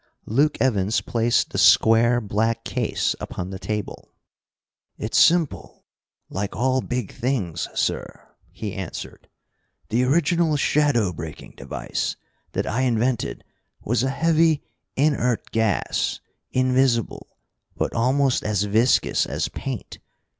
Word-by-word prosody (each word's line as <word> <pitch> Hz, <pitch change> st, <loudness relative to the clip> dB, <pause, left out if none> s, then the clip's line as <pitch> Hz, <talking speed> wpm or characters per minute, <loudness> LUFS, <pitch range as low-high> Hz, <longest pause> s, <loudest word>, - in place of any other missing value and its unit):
Luke 140 Hz, +7 st, +2 dB
Evans 105 Hz, -4 st, +2 dB
placed 115 Hz, 0 st, 0 dB
the -, -, -2 dB
square 115 Hz, +2 st, +5 dB
black 115 Hz, +1 st, -1 dB
case -, -, -1 dB
upon 95 Hz, +1 st, -5 dB
the 95 Hz, -, -6 dB
table. 105 Hz, +3 st, -5 dB, 0.9 s
"It's -, -, 0 dB
simple, 170 Hz, -3 st, +2 dB, 0.4 s
like 100 Hz, +1 st, -4 dB
all 130 Hz, +3 st, +1 dB
big 125 Hz, -5 st, -4 dB
things, 105 Hz, -, -2 dB
sir," -, -, -3 dB, 0.2 s
he 105 Hz, -3 st, -6 dB
answered. 95 Hz, -4 st, -7 dB, 0.6 s
"The 120 Hz, +3 st, +2 dB
original 160 Hz, +2 st, +2 dB
shadow 140 Hz, -10 st, +2 dB
breaking 80 Hz, -1 st, -8 dB
device -, -, -4 dB, 0.4 s
that -, -, -1 dB
I 120 Hz, +5 st, -1 dB
invented 125 Hz, -1 st, 0 dB, 0.4 s
was 120 Hz, +3 st, +1 dB
a 130 Hz, -, +1 dB
heavy, 160 Hz, +1 st, +2 dB, 0.3 s
inert 135 Hz, -4 st, +1 dB
gas, 110 Hz, -4 st, 0 dB, 0.3 s
invisible, 130 Hz, -2 st, 0 dB, 0.4 s
but -, -, -1 dB
almost 130 Hz, +3 st, +2 dB
as 105 Hz, -2 st, 0 dB
viscous 110 Hz, +5 st, +2 dB
as -, -, -2 dB
paint. -, -, -6 dB
120 Hz, 115 wpm, -23 LUFS, 105-135 Hz, 0.9 s, square